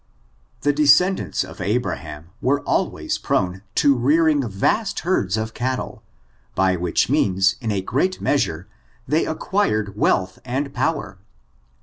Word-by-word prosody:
The 145 - +2
descendants 155 +6 +3
of - - -10
Abraham 90 -6 -3
were 140 +2 +1
always - - -1
prone 95 +1 -1
to 140 -1 +4
rearing 145 +2 +2
vast 195 - 0
herds 110 - 0
of 110 0 -3
cattle, 130 +1 -3 0.5
by 95 -1 +2
which 85 -1 0
means, 95 0 +2
in 115 -2 -2
a 100 -2 -1
great 165 - 0
measure, 90 - 0 0.4
they 155 +2 +1
acquired 110 - -1
wealth 95 -2 +1
and 135 +3 -3
power. 105 -12 -2
120 Hz, 125 wpm, -21 LUFS, 95-145 Hz, 0.5 s, to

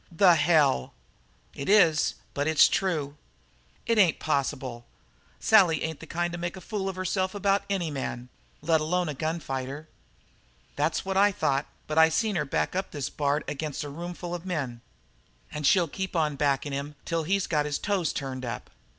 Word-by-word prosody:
"The 175 +1 +6
hell!" 150 - +3 0.6
"It 140 - -5
is; 170 -7 +4 0.2
but 145 +1 -1
it's 160 -1 +6
true." 155 -6 -1 0.7
"It 230 -2 +2
ain't 180 -6 +5
possible. 130 -5 -2 0.5
Sally 180 -9 +4
ain't 160 -1 -3
the 160 - -10
kind 175 +2 -1
to 175 - -5
make 175 +2 -4
a - - -7
fool 195 +1 -3
of 190 - -5
herself 185 +1 -1
about 200 0 +2
any 180 -5 -1
man, 125 -3 -5 0.3
let 160 0 +3
alone 175 +2 0
a - - -2
gun 160 +4 -2
fighter." 135 +1 -5 0.9
"That's 155 +5 0
what 190 0 -1
I 205 +1 +5
thought, 140 -8 0 0.2
but 155 +1 +1
I 160 0 +7
seen 210 +5 0
her 150 -3 0
back 140 - -1
up 190 +1 -1
this 145 -4 -4
Bard 145 0 0
ag'in' 150 0 -4
a 145 - -6
roomful 175 +3 -6
of 175 -1 -5
men. 140 -10 -3 0.7
And 150 -1 -1
she'll 180 -3 +4
keep 190 +4 -5
on 155 -3 +1
backin' 140 0 0
him 140 +2 -4
till 165 -1 -1
he's 195 +4 +1
got 150 -2 0
his 145 - -1
toes 195 -6 0
turned 130 -2 -5
up." 120 -1 -6
160 Hz, 185 wpm, -27 LUFS, 145-180 Hz, 0.9 s, I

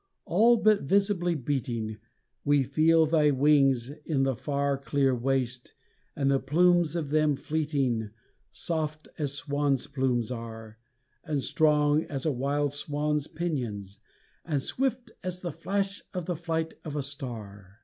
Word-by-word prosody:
All 230 +7 +5
but 215 -2 +4
visibly 190 +1 +2
beating 120 -6 -2 0.5
We 145 -1 +3
feel 160 +4 +4
thy 155 -1 +3
wings 135 -3 +3
in 145 -4 0
the 135 -1 +1
far 140 +2 -1
Clear 135 -1 +1
waste, 125 0 -1 0.4
and 140 -1 +1
the 135 - +3
plumes 175 +3 +3
of 160 -4 -2
them 155 -1 +3
fleeting, 135 -8 -1 0.4
Soft 155 -2 -3
as 145 -2 -1
swan's 145 -1 0
plumes 130 -4 -1
are, 115 -2 -7 0.4
And 150 -5 -2
strong 150 0 +3
as 135 -1 -5
a 155 - +2
wild 140 +2 0
swan's 150 0 -1
pinions, 120 - -4 0.4
and 150 -4 -1
swift 250 -2 -2
as 180 0 -4
the 175 - -3
flash 195 +5 -2
of 180 -2 -3
the 175 - -2
flight 160 0 -2
of 150 -2 -6
a 145 - -1
star. 110 -8 -6
145 Hz, 140 wpm, -28 LUFS, 130-160 Hz, 0.5 s, All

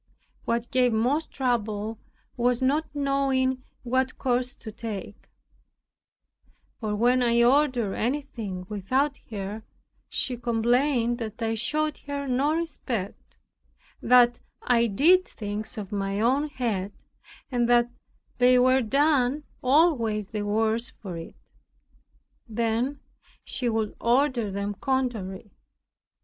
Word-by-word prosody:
What 235 0 -1
gave 255 -2 +3
most 260 +8 +1
trouble 220 -4 -2 0.4
was 245 0 +1
the 260 - 0
not 300 +4 +1
knowing 270 -2 +1 0.2
what 255 +1 0
course 250 0 0
to 220 - -9
take; 210 -2 -7 1.5
for 215 -2 -2
when 245 +4 +3
I 235 -1 +4
ordered 250 -5 +3
anything 225 -7 -3
without 255 +8 0
her, 205 0 -5 0.5
she 250 -2 -2
complained 240 +1 +1
that 220 -1 -6
I 225 -1 0
showed 305 +7 -1
her 280 -1 -3
no 275 +5 +1
respect, 255 - -4 0.6
that 240 -1 +5 0.2
I 235 -1 +3
did 335 - +4
things 210 0 -5
of 205 -2 -6
my 195 0 -2
own 265 +7 +2
head 225 -8 -2 0.6
and 240 -1 +1
that 240 0 +4 0.5
they 250 0 +6
were 255 +1 +4
done 280 +2 +2 0.2
always 250 - +2
the 215 -2 -3
worse 220 +3 0
for 185 -5 -9
it. 165 0 -8 1.1
Then 235 +5 -1 0.4
she 245 -2 -2
would 220 -2 -1
order 245 -2 +2
them 200 +1 -3
contrary. 215 -5 -2
240 Hz, 115 wpm, -26 LUFS, 215-265 Hz, 1.5 s, they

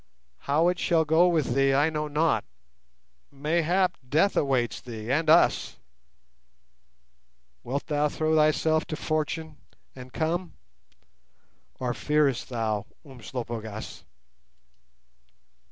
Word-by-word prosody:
How 155 +4 +3
it 180 0 -2
shall 165 -2 +2
go 160 +4 +4
with 155 -8 +1
thee, 135 +1 +3
I 145 +3 +3
know 150 -1 -2
not; 150 -7 +1 0.9
mayhap 170 +6 0
death 160 +9 +2
awaits 130 -4 0
thee 115 -1 -6
and 155 +3 +1
us. 165 +2 +3 1.9
Wilt 140 +3 -3
thou 150 -1 0
throw 155 +1 0
thyself 155 +1 +2
to 155 - -5
Fortune 155 0 -3 0.4
and 130 -1 -11
come, 170 +5 -2 1.3
or 125 -1 -1
fearest 150 -2 0
thou, 110 -4 -2 0.2
Umslopogaas?" 115 -3 -7
150 Hz, 105 wpm, -26 LUFS, 125-160 Hz, 1.9 s, go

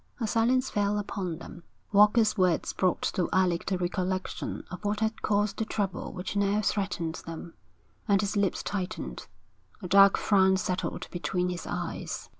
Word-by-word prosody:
A 230 - -1
silence 240 +4 +2
fell 205 0 +1
upon 190 -4 -3
them. 170 +1 -10 0.3
Walker's 210 +2 +5
words 185 -4 +1
brought 185 -2 +1
to 180 - 0
Alec 185 -2 +1
the 190 - +1
recollection 185 +1 -3
of 180 - -7
what 205 +1 -1
had 220 0 -1
caused 205 0 +1
the - - 0
trouble 200 -4 -3
which 185 +2 -5
now 200 +1 +2
threatened 185 -6 -1
them, 165 0 -7 0.5
and 200 -2 +4
his 205 +1 -1
lips 200 -2 0
tightened. 200 +1 -4 0.6
A - - -3
dark 195 +2 +7
frown 190 -2 +4
settled 185 -1 -3
between 180 0 -1
his 180 -1 -5
eyes. - - -4
195 Hz, 160 wpm, -28 LUFS, 180-210 Hz, 0.6 s, dark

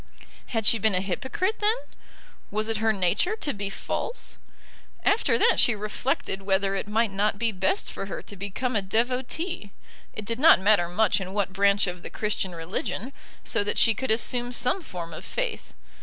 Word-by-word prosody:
Had 225 -3 -2
she 225 - +6
been 215 -1 +4
a - - +3
hypocrite 265 - -2
then? 425 +2 +3 0.7
Was 215 +2 -1
it 225 - 0
her 220 +1 +2
nature 205 - +1
to 300 -9 -1
be 200 -1 -4
false? 470 - -4 0.7
After 390 - +3
that - - +3
she 240 - +5
reflected 210 0 -2
whether 195 0 +1
it 195 - -3
might 220 +1 +1
not 200 +1 0
be 230 +1 0
best 195 - 0
for 195 - -5
her - - -6
to 205 - -10
become 205 +6 -3
a 205 - +2
devotee, 250 - -2 0.4
it 215 - -7
did 230 +3 -3
not 315 -5 +7
matter 190 -3 +3
much 205 +2 +2
in 190 +1 -6
what 200 -2 0
branch 200 +1 +3
of 180 -2 -5
the - - -7
Christian 200 -4 -2
religion, 185 +9 -4 0.3
so - - +1
that 205 - -2
she 225 - +5
could 260 +5 -4
assume 240 +2 +1
some 250 +9 +1
form 170 - -7
of 155 - -8
faith. - - -4
210 Hz, 185 wpm, -26 LUFS, 195-245 Hz, 0.7 s, not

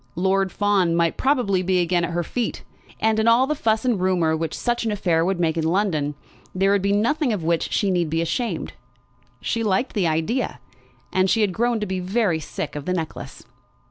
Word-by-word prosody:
Lord 190 +2 +1
Fawn 195 -4 +2
might 170 -1 +1
probably 245 -9 +1
be 185 0 +1
again 175 0 +1
at 170 - -1
her 175 0 -1
feet. 240 +7 -3 0.4
And 220 0 +2
in 220 - +1
all 235 +3 +5
the 300 - 0
fuss 225 -4 0
and 235 -7 +1
rumour 175 -4 +2
which 160 -1 -3
such 240 -1 -1
an 225 - -1
affair 175 -5 +1
would 185 +1 -1
make 165 -1 +1
in 165 - 0
London, 160 -4 0 0.4
there 195 +1 +3
would 200 -1 +2
be 200 +1 +1
nothing 245 +7 +1
of 200 -6 -2
which 165 0 0
she 200 -2 +1
need 175 -3 0
be 165 +1 0
ashamed. 170 +9 -2 0.7
She 230 - -1
liked 215 +3 0
the 195 -6 +1
idea, 165 +11 -1 0.5
and 185 0 +2
she 225 - +2
had 200 -3 +1
grown 235 +3 +1
to - - 0
be 190 -1 -3
very 185 -2 0
sick 150 - -6
of 145 -1 -5
the 180 - -1
necklace. 165 -3 -5
190 Hz, 210 wpm, -23 LUFS, 170-220 Hz, 0.7 s, all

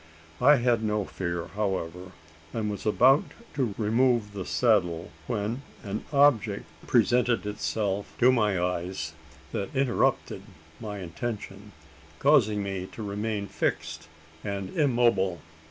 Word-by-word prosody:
I 145 +4 +7
had 120 -3 +2
no 105 -2 0
fear, 85 -3 -3
however; 90 -3 -3 0.4
and 110 -2 -1
was 105 - -5
about 130 +7 +5 0.3
to 125 -8 -1
remove 115 -1 +2
the 95 -3 -5
saddle, 90 -8 +1 0.2
when 115 +2 -2 0.2
an 105 0 -4
object 140 -7 +3 0.2
presented 120 -4 +3
itself 105 -1 -2
to 125 +2 +6
my 105 -6 +2
eyes 85 -2 -2 0.4
that 100 +7 -4
interrupted 130 -2 +1 0.4
my 105 -3 -5
intention 100 +2 -6 0.5
causing 110 - +3
me 95 -2 -4
to 110 - -6
remain 105 0 -2
fixed - - -3 0.4
and 100 -2 -4
immobile. 120 - +2
105 Hz, 120 wpm, -27 LUFS, 95-120 Hz, 0.5 s, I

